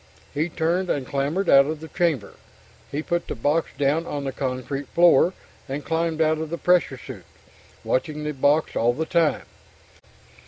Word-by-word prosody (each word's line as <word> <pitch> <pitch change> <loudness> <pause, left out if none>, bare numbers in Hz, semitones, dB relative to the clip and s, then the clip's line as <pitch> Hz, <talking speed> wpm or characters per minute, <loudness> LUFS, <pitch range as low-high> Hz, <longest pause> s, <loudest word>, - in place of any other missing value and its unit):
He 155 +4 -1
turned 175 +3 0
and 140 -3 -1
clambered 145 +9 -1
out 140 0 +6
of 155 0 -3
the 160 - -9
chamber. 160 - -1 0.6
He 150 +2 -3
put 175 +1 -2
the - - -4
box 145 +7 0
down 145 +4 +1
on 145 -1 -4
the 135 - -2
concrete 130 +1 -4
floor, 175 +1 +5 0.4
and 140 +2 -4
climbed 165 0 -1
out 155 0 +2
of 160 -1 -4
the 170 - -3
pressure 180 -7 +2
suit, - - -10 0.6
watching 150 +3 -1
the 150 0 -2
box 145 +3 +2
all 120 +1 +2
the 160 +6 -2
time. 165 -2 +1
155 Hz, 170 wpm, -24 LUFS, 140-165 Hz, 0.6 s, out